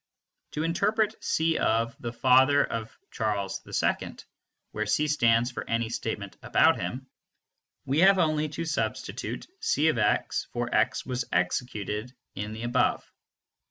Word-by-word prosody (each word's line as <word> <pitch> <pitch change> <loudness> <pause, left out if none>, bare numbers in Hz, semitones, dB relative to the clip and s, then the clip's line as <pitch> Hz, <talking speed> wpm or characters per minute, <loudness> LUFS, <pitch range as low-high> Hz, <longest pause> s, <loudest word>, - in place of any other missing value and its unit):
To 155 - -2
interpret 210 +6 0
"C 160 0 +1
(the 115 +1 -1
father 130 +2 +5
of 115 -1 -6
Charles 105 -3 -2
II)," - - -1 0.6
where 105 0 -3
C 150 +9 +2
stands 120 -4 +3
for - - -5
any 115 0 0
statement 105 -4 -4
about - - +3
him, 130 +2 -4 0.8
we 140 +3 +1
have 190 +2 +6
only 155 -3 +1
to 165 +3 -4
substitute 160 - -3
C 455 +2 +2
(x) - - 0
for - - -2
"x - - +1
was 125 -1 -2
executed" 105 +4 -2 0.2
in 105 +2 -5
the 110 +1 -7
above. 120 0 +1
125 Hz, 130 wpm, -27 LUFS, 110-155 Hz, 0.8 s, have